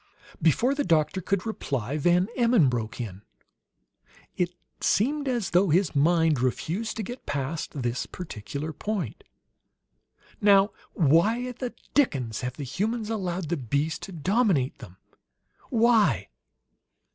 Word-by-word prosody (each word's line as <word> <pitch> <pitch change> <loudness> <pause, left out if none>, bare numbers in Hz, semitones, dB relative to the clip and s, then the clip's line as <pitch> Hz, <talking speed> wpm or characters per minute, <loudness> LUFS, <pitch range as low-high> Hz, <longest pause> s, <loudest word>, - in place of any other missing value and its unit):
Before 200 - +3
the 285 0 0
doctor 165 - +2
could 195 +2 -1
reply, 140 - -3
Van 175 +5 +3
Emmon 235 - +4
broke 115 -2 -3
in. 100 -5 -6 1.1
It 175 0 -1 0.2
seemed 285 +7 +1
as 240 -6 -1
though 180 +2 +4
his 175 +1 +2
mind 160 -1 +3
refused 175 - -2
to 220 - -2
get 245 +5 -8
past 145 0 -3
this 120 +1 -2
particular 150 - -6
point. 190 - -4 1.2
"Now, 200 0 +5 0.2
why 205 - +3
the 250 0 -6 0.2
dickens 130 - +1
have 125 0 -4
the 145 - -4
humans 215 - -2
allowed 185 -6 -2
the 170 - 0
bees 145 +6 -1
to 195 - -8
dominate 175 - +1
them? 95 -8 -12 0.7
Why?" 225 - +3
175 Hz, 125 wpm, -26 LUFS, 140-220 Hz, 1.2 s, Now